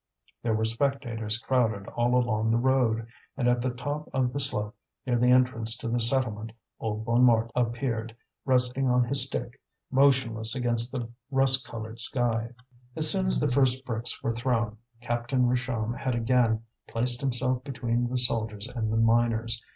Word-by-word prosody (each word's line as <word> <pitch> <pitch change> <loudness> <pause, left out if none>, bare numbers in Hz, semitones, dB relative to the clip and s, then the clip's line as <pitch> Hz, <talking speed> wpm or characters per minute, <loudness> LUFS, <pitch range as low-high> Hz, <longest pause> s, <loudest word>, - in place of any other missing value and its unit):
There 115 -2 -1
were 110 +1 -1
spectators 115 -2 -1
crowded 115 -4 -1
all 120 +1 -1
along 110 -3 0
the 115 - +2
road. 120 -3 0 0.3
And 125 -3 -1
at 120 0 +1
the 130 - -1
top 145 +5 -6
of 125 -2 -1
the 140 - -3
slope 105 -5 0 0.3
near 125 -2 -1
the 125 +1 +2
entrance 125 -3 +2
to 115 - -4
the 120 +1 -1
settlement, 115 -3 0 0.3
old 110 0 -4
Bonnemort 115 -1 +2
appeared, 115 -2 -3 0.3
resting 130 0 +2
on 125 0 +2
his 135 +2 +6
stick, 125 0 -6 0.3
motionless 130 -5 +2
against 120 -1 +3
the 125 -4 -5 0.2
rust 135 -1 +3
coloured 110 0 -8
sky. 115 -1 +1 0.5
As 155 -1 +8
soon 190 +1 0
as 185 - +2
the 145 -3 -1
first 130 0 +1
bricks 120 0 -1
were 115 - -1
thrown, 115 -2 -2 0.2
Captain 120 +2 -1
Richomme 120 -2 -2
had 130 -2 -3
again 115 -1 0 0.2
placed 120 +1 +1
himself 130 -1 +2
between 120 -3 -3
the 130 - -2
soldiers 110 -4 +1
and 115 -3 -4
the 110 - -1
miners. 115 0 +1
120 Hz, 165 wpm, -26 LUFS, 115-130 Hz, 0.5 s, As